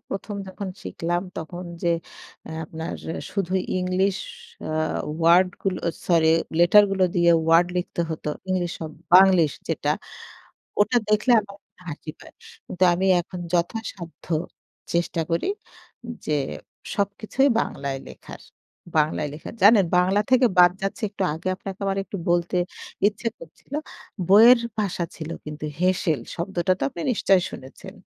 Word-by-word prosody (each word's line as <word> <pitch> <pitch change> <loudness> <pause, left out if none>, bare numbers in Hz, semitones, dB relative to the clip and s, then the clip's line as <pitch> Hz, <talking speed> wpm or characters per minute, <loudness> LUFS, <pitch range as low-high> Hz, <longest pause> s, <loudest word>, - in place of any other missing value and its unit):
১ম 200 +1 -5
যখন 195 +1 -6
শিখলাম। 175 +1 -2
তখন 175 +3 -6 0.2
যে 175 - +1 0.6
অ্যা - - -7
আপনার 160 +1 -6 0.4
শুধু 190 -3 -2 0.3
ইংলিশ 185 +1 +1 0.5
অ্যা - - -4 0.5
ওয়ার্ড 170 +3 +5
গুলো 190 -2 -1 0.3
সরি 165 -2 +4 0.3
লেটার 190 +5 +7
গুলো 190 -1 +2
দিয়ে 170 0 +5
ওয়ার্ড 165 +2 +5
লিখতে 175 -1 -2
হত। 160 - -5 0.3
ইংলিশ 180 -2 0
শব 160 -1 -6 0.2
বাংলিশ 185 -4 +7 0.2
যেটা। - - -1 0.9
ওটা 215 +4 +4
দেখলে 215 +4 +3
আমার 200 -1 -12 0.3
হাসি 155 0 -6
পায়। - - -15 0.3
কিন্তু 185 +1 0
আমি 190 +2 0
এখন 180 +1 -8
যথাসাধ্য 175 -1 -3 0.7
চেষ্টা 170 -1 0
করি 165 - 0 0.8
যে, 150 - +1 0.6
সবকিছুই 205 +7 +1
বাংলায় 135 -7 -3
লেখার। - - -12 0.6
বাংলায় 150 0 +1
লেখার। 155 - -9
জানেন 205 -1 +7
বাংলা 185 +3 +3
থেকে 255 0 +5
বাদ 175 0 +8
যাচ্ছি 195 +3 -3
একটু 200 - -4
আগে 165 +3 -5
আপনাকে 195 +1 -8
আমার 195 0 0
একটু 200 - -6
বলতে 175 +1 +1 0.5
ইচ্ছে 210 +3 -4
করছিল। - - -13 0.5
বইয়ের 230 +5 +8 0.2
ভাষা 195 -4 -1
ছিল 160 0 -6 0.2
কিন্তু 150 0 -7 0.2
হেঁসেল 180 -4 +1 0.2
শব্দটা 180 +1 0
তো - - -8
আপনি 170 - -7
নিশ্চয়ই 195 -5 +3
শুনেছেন। 180 +9 -11
180 Hz, 135 wpm, -24 LUFS, 170-200 Hz, 0.9 s, বাদ